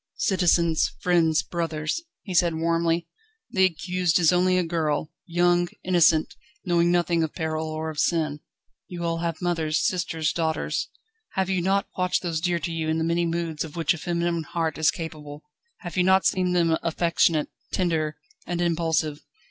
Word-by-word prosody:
"Citizens, 170 -4 +2
friends, 170 -5 +2
brothers," 165 - -2 0.2
he 190 - -6
said 170 -2 +3
warmly, 165 +1 0 0.4
"the 190 -1 +4
accused 180 -1 0
is 175 -1 +4
only 185 +1 +3
a 180 - +2
girl, 160 -2 -1 0.2
young, 175 0 +2 0.2
innocent 165 -3 +3 0.3
knowing 175 -1 +3
nothing 175 -1 +2
of 160 -2 -2
peril 160 0 -2
or 155 0 -3
of 150 - -7
sin. 155 -4 +1 0.5
You 175 -1 -6
all 165 0 -1
have 170 0 -3
mothers, 160 -3 0
sisters, 160 -3 0
daughters 160 -2 -1 0.4
have 190 0 0
you 185 -2 +1
not 195 +2 +1
watched 180 0 0
those 165 -3 -2
dear 175 0 +1
to 170 +1 -4
you 160 -1 -2
in 160 - +1
the 160 - 0
many 170 +1 +1
moods 165 -2 -2
of 160 -1 -9
which 165 0 +2
a 170 - -7
feminine 170 0 -1
heart 160 0 -3
is 155 -1 +4
capable; 155 -2 -6 0.4
have 175 -5 -7
you 180 - +3
not 190 +1 +4
seen 180 -1 +2
them 165 -2 +3
affectionate, 165 -2 +1 0.2
tender, 160 -4 0 0.3
and 175 0 -2
impulsive? 165 -3 0
170 Hz, 170 wpm, -25 LUFS, 160-175 Hz, 0.5 s, the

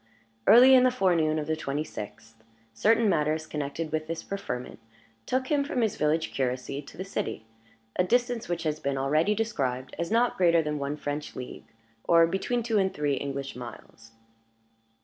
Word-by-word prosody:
Early 255 +3 +9
in 255 - +8
the 255 - +5
forenoon 175 -10 +2
of 150 - -2
the 160 +1 -1
twenty 150 -1 -3
sixth, 110 -3 -10 0.3
certain 225 - +3
matters 155 -3 +1
connected 150 +2 -4
with 155 0 -2
this 165 0 -4
preferment 125 -14 -5 0.5
took 260 0 0
him 290 -1 +3
from 280 -4 -2
his 220 -2 +1
village 155 +2 0
curacy 130 +1 -2
to 140 - -14
the 185 - -5
city 155 - -4 0.5
a 180 - +4
distance 245 +1 0
which 175 -1 -2
has 155 -1 -1
been 140 -2 -2
already 155 +9 +2
described 130 - -2
as 170 - -2
not 235 +3 +2
greater 170 -2 +4
than 150 -1 -2
one 140 +1 -3
French 145 0 -5
league, 125 -1 -8 0.4
or 165 -1 +5
between 195 +7 -1
two 225 -2 +1
and 190 -1 +1
three 145 -1 0
English 140 0 -4
miles. 115 -2 -11
155 Hz, 175 wpm, -27 LUFS, 140-200 Hz, 0.5 s, Early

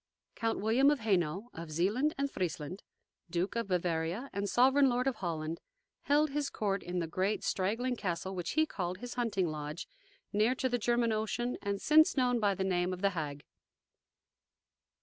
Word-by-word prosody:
Count 225 0 -1
William 235 +7 +4
of 295 -4 +1
Hainault, 195 +1 0
of 165 0 -7
Zealand 205 - +1
and 280 0 -1
Friesland, 180 0 -3 0.5
Duke 175 +5 -1
of 230 -3 -1
Bavaria 175 +6 -1
and 200 0 -2
Sovereign 265 +5 +5
Lord 250 +1 0
of 265 -4 0
Holland, 165 -3 -3 0.4
held 295 +1 +3
his 285 0 -1
court 200 -2 -1
in 175 +1 -4
the 170 - 0
great, 190 +5 -1
straggling 225 +7 0
castle 190 -3 -3
which 175 -3 -3
he 315 +1 +4
called 180 - -4
his 245 +4 -7
"hunting 225 -7 0
lodge," 155 +1 -5 0.5
near 215 +5 +3
to 260 - 0
the 245 -1 0
German 235 0 +2
Ocean, 220 +3 -1
and 200 -1 -2
since 310 +4 +5
known 250 -2 +3
by 205 -3 +2
the 190 - -1
name 180 -1 0
of 185 +2 -7
"The 200 - +4
Hague." 145 -5 -4
200 Hz, 175 wpm, -32 LUFS, 175-245 Hz, 0.5 s, Sovereign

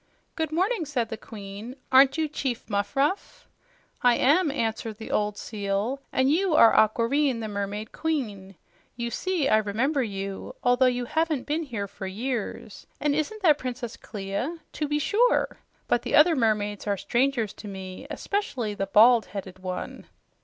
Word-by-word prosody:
"Good 320 -2 -2
morning," 370 +3 0
said 245 -6 -1
the - - -3
Queen. 210 +2 -9 0.2
"Aren't 265 +3 +6
you 315 -1 +1
Chief 265 -5 -3
Muffruff?" 275 - -1 0.5
"I 245 -1 +5
am," 305 +8 +3
answered 225 -4 -2
the 220 - -8
old 210 0 0
seal. 210 +5 -2
"And 260 +1 +2
you 350 +1 +2
are 230 - +7
Aquareine, 235 +4 +3
the 220 - -4
mermaid 205 +1 -4
queen. 210 -12 -3 0.4
You 235 -1 -3
see, 365 -4 0
I 215 - +5
remember 230 +8 0
you, 195 +1 -5
although 245 +1 +4
you 245 -1 0
haven't 315 -1 0
been 305 +3 -1
here 230 -10 -4
for 195 0 -7
years. 220 0 -4
And 295 -1 +1
isn't 310 +9 -2
that 305 -5 +5
Princess 250 -2 -5
Clia? 205 +10 -4 0.2
To 300 - -2
be 295 +1 0
sure! 450 - +2 0.3
But - - +2
the - - -1
other 315 +3 +6
mermaids 210 -4 0
are 200 -1 +1
strangers 240 0 0
to 210 - -10
me, 190 +5 -8
especially 275 - -2
the 195 -1 -3
bald 225 +2 +6
headed 190 -1 -7
one." 185 -1 -6
240 Hz, 160 wpm, -26 LUFS, 205-295 Hz, 0.5 s, are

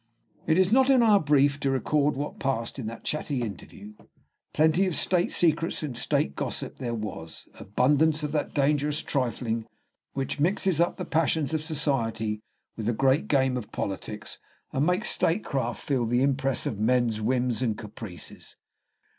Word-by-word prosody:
It 160 +1 +3
is 190 +2 +4
not 265 +1 +5
"in 260 -3 +6
our 210 -3 +6
brief" 145 -2 +3
to 140 - 0
record 145 +2 +1
what 145 +2 -5
passed 130 -1 -2
in 115 - -4
that 115 +1 -7
chatty 145 -4 -2
interview; 105 0 -8 0.6
plenty 160 +5 +3
of 180 - -2
state 180 -2 +1
secrets 165 -1 +1
and 140 -5 -4
state 70 -10 0
gossip - - -4
there 120 -3 -2
was, 105 -7 -7
abundance 150 +8 +2
of 150 - -2
that 150 -1 -1
dangerous 145 +1 +1
trifling 115 -4 -1 0.5
which 135 +2 -3
mixes 180 +1 +2
up 175 - +1
the - - -4
passions 160 -1 +1
of 155 - 0
society 115 -9 -1 0.3
with 110 -2 -4
the 120 - +2
great 135 +5 +2
game 130 -2 +2
of 115 -4 -7
politics, 105 +2 -5 0.3
and 140 +4 +1
makes 180 0 +1
statecraft 135 - 0
feel 130 -5 0
the 120 +3 +2
impress 135 -1 +1
of 105 - -3
men's 115 -1 +2
whims 125 +1 0
and 115 -4 0
caprices. 105 -5 -9
135 Hz, 165 wpm, -27 LUFS, 115-155 Hz, 0.6 s, in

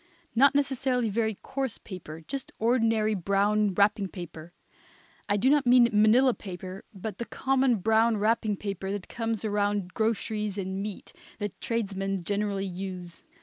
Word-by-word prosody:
Not 275 +4 +5
necessarily 260 -4 +1
very 220 0 0
coarse 265 -3 -3
paper; 165 -5 -9
just 275 -2 -5
ordinary 225 -2 +2
brown 200 +1 +1
wrapping 200 0 +3
paper. 170 -3 -9 0.8
I 205 - +3
do 235 - +2
not 285 -1 +4
mean 245 -1 +7
manila 225 +5 +5
paper, 185 -1 -8
but 200 0 -7
the 235 - -3
common 265 -1 +2
brown 220 +3 +3
wrapping 215 0 +1
paper 195 -1 -4
that 205 -2 -5
comes 225 -2 -3
around 205 -3 0
groceries 215 -2 -1
and 190 0 -3
meat, 205 -1 -6 0.2
that 205 -3 -5
tradesmen 195 -4 -2
generally 200 +1 -1
use. 180 -2 -6
210 Hz, 145 wpm, -28 LUFS, 195-230 Hz, 0.8 s, mean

